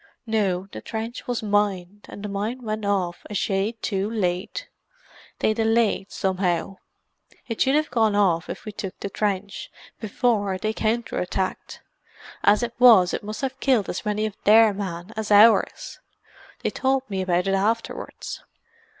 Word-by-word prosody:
No, 200 -5 0
the - - -8
trench 225 +2 -6
was 245 -2 -2
mined, 205 -2 -1
and 205 - -9
the - - -3
mine 210 +6 -3
went 215 -1 -3
off 185 -4 -1
a 210 - -5
shade 200 +4 -1
too 195 0 -1
late. 205 - -2 0.7
They 215 - +1
delayed, 225 -2 +1
somehow; 185 -1 -1 0.7
it 230 - -4
should 270 +1 +3
have 305 -2 +1
gone 220 -3 +2
off 175 -5 +2
if - - -7
we 215 - -5
took 200 -2 -7
the 200 - -5
trench, 200 -1 -2 0.3
before 210 -3 0
they 215 +3 -2
counter 230 +2 -1
attacked. 185 +1 -3 0.6
As 210 +3 +4
it 235 0 -3
was, 225 -8 +7
it - - -2
must 215 +1 -6
have 265 -1 -3
killed 250 -9 +2
as - - -4
many 210 0 -1
of 215 -2 -4
their 220 0 +6
men 185 -1 -5
as 220 -1 -4
ours. 215 +2 +4 0.6
They - - 0
told 265 0 0
me 195 -2 -3
about 180 0 +1
it 195 - +1
afterwards." 220 +4 -2
210 Hz, 160 wpm, -24 LUFS, 195-225 Hz, 0.7 s, was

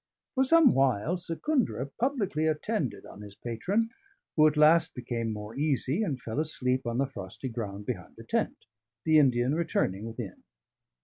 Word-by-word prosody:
For 265 - +3
some 315 -1 +6
while, 135 - +2
Secundra 180 - -1
publicly 200 - 0
attended 155 - -1
on 105 - -11
his 100 -1 -10
patron, 190 - -1 0.4
who 155 -1 +6
at 150 0 0
last 160 +2 +5
became 120 -2 -3
more 105 +1 -6
easy, 145 - 0
and 155 -11 -1
fell 115 +3 -4
asleep 130 -5 0
on 120 0 -1
the 135 - +2
frosty 135 -1 -6
ground 105 -4 -5
behind 100 -8 -5
the - - -11
tent, - - -2 0.4
the 155 -1 +6
Indian 125 -2 +3
returning 110 - 0
within. 115 -3 -7
135 Hz, 160 wpm, -29 LUFS, 115-165 Hz, 0.4 s, some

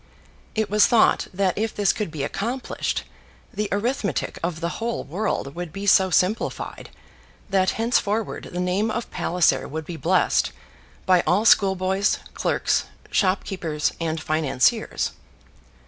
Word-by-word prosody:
It 220 -1 +1
was 210 +1 +4
thought 235 -2 +4
that 185 -1 0
if 220 0 -1
this 205 -2 +2
could 210 -5 -3
be 155 -3 -4
accomplished, 235 - -2 0.5
the 210 -1 -2
arithmetic 205 - -1
of 170 -1 -2
the 170 0 -3
whole 230 +1 -2
world 170 -5 -2
would 175 -1 -6
be 195 +3 -6
so 190 -1 +5
simplified 185 +6 -1 0.6
that 190 -1 +3
henceforward 225 -2 0
the 180 - -4
name 185 +5 0
of 230 +2 -4
Palliser 165 -6 +1
would 160 +1 -5
be 170 +1 -6
blessed 180 +3 +2 0.5
by 185 -1 +5
all 200 +5 +3
schoolboys, 190 -1 +3 0.2
clerks, - - 0 0.3
shopkeepers, 185 -5 0
and 160 -1 -1
financiers. 155 -5 +1
190 Hz, 130 wpm, -23 LUFS, 170-210 Hz, 0.6 s, so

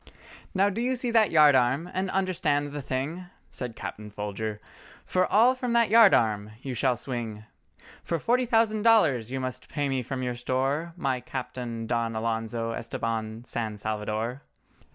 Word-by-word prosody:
"Now 200 +2 +3
do 225 - -3
you 255 +2 +1
see 245 -1 -2
that 225 -3 +4
yard 150 -3 +6
arm—and 150 +10 +1
understand 165 -7 0
the 145 0 -5
thing?" 140 +8 -3 0.2
Said 125 -3 -5
Captain 105 -1 -7
Folger, 105 +1 -4 0.5
"For 185 0 +1
all 235 +5 +5
from 250 -2 -3
that 235 -3 +3
yard 225 -3 +8
arm 105 -2 0
you 135 - -4
shall 125 +1 +1
swing, 115 -5 -5 0.6
Or 170 - +1
forty 245 - +1
thousand 225 -2 +2
dollars 155 - +4
you 135 - -2
must 130 -1 -5
pay 145 -2 -1
me 135 -1 0
from 130 +1 -4
your 125 -1 -1
store, 135 +7 -1
My 135 -5 0
Captain 120 -3 -5
Don 115 -1 -1
Alonzo 115 +1 -2
Estabán 115 0 -4
San 110 -4 -4
Salvador." 110 +4 -3
130 Hz, 160 wpm, -27 LUFS, 115-185 Hz, 0.6 s, yard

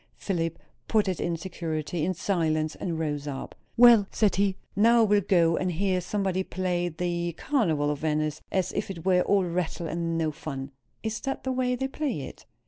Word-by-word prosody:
Philip 165 -4 -2 0.3
put 215 -3 +2
it 185 -2 -1
in 170 -1 -1
security, 160 -3 -3
in 185 +3 0
silence, 155 -4 0
and 170 -3 -3
rose 150 -2 -2
up. 135 -2 -5 0.2
"Well," 235 -4 +8
said 205 -5 +1
he, 195 -1 +2 0.2
"now 230 +3 +5
I - - +6
will 205 -1 +4
go 170 -3 +3
and 185 -1 0
hear 185 +1 0
somebody 190 0 -1
play 180 -1 -1
the 175 0 -2
'Carnival 160 - +1
of 145 - -3
Venice,' 155 -1 -1
as 185 -2 0
if - - -3
it 170 -3 -7
were 180 -1 +4
all 195 +1 +3
rattle 170 -1 -2
and 165 0 -2
no 160 -1 0
fun." 135 -2 -6 0.3
"Is 220 -1 -2
that 270 -1 -4
the 260 - -1
way 250 -1 +1
they 265 +1 -2
play 270 - -3
it?" 130 - -9
175 Hz, 195 wpm, -27 LUFS, 160-200 Hz, 0.3 s, Well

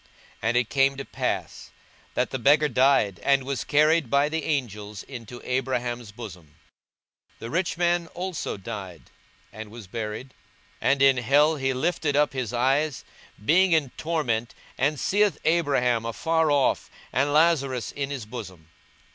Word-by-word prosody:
42:016:022 - - -30 0.4
And 120 - +2
it 120 -2 +1
came 135 -1 +3
to 135 - -5
pass, - - -3 0.5
that - - 0
the 130 - -3
beggar 145 +4 +4
died, 125 -8 +3
and 140 -1 +3
was 135 -2 -3
carried 150 -1 +3
by 140 +3 +3
the 160 0 -2
angels 105 -8 -3
into 120 -2 -9
Abraham's 125 -3 -2
bosom: 90 -9 -11 0.8
the 115 - -7
rich 175 +1 -1
man 175 -1 +1
also 180 - -4
died, 95 -4 -8 0.4
and 110 0 -8
was 115 0 -10
buried; 110 +5 -5 0.5
42:016:023 - - +3
And 140 -1 +1
in 135 -1 +6
hell 145 +6 +4
he 135 -1 0
lift 160 +4 -1
up 145 0 +2
his 130 -5 -3
eyes, 135 +4 0 0.4
being 185 +5 +4
in 150 -5 +2
torments, 120 -9 -2 0.2
and 145 +2 0
seeth 205 +5 +2
Abraham 135 -8 +2
afar 160 +7 +1
off, 145 -2 +2 0.2
and 140 +3 +1
Lazarus 145 -6 +2
in 140 -1 -4
his 135 -6 -5
bosom. 95 -8 -9
135 Hz, 155 wpm, -25 LUFS, 115-150 Hz, 0.8 s, in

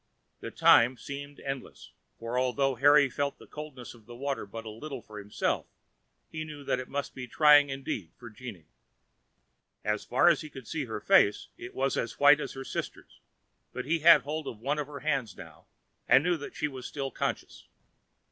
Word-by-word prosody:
The - - -6
time 125 +2 +5
seemed 140 +4 -8
endless, 135 -2 -7 0.3
for 115 +1 -5
although 130 +2 +1
Harry 145 +3 +5
felt 140 +2 -3
the - - -15
coldness 150 -5 -9
of 115 -3 -19
the 120 - -10
water 135 -3 -3
but 115 +3 -8
little 120 +4 -7
for 105 -1 -10
himself, 105 0 -2 0.6
he 160 0 -4
knew 150 -2 -9
that 130 - 0
it 130 - -7
must 145 0 -4
be 125 -1 -7
trying 145 +2 +6
indeed 135 -10 -4
for 120 -1 -11
Jeanne. 105 -7 -10 1.2
As 105 0 -1
far 125 +7 +2
as 170 -4 +5
he 155 - -8
could 135 -4 -11
see 155 -4 -3
her 110 -2 -5
face 105 - +3
it 120 - -10
was 135 +1 0
as 115 - -3
white 145 +1 +7
as - - -5
her 135 - -7
sister's; - - -6 0.5
but 125 - -5
he 165 +4 +1
had 160 -2 +7
hold 155 +2 -4
of 115 - -6
one 140 +7 -2
of 145 - -3
her 145 -1 -9
hands 135 -10 -1
now, 80 -5 -13 0.4
and 135 - +6
knew 175 +1 +2
that 145 -3 -8
she 150 - -1
was 130 -3 -7
still 135 -2 -4
conscious. - - -4
135 Hz, 195 wpm, -29 LUFS, 120-145 Hz, 1.2 s, white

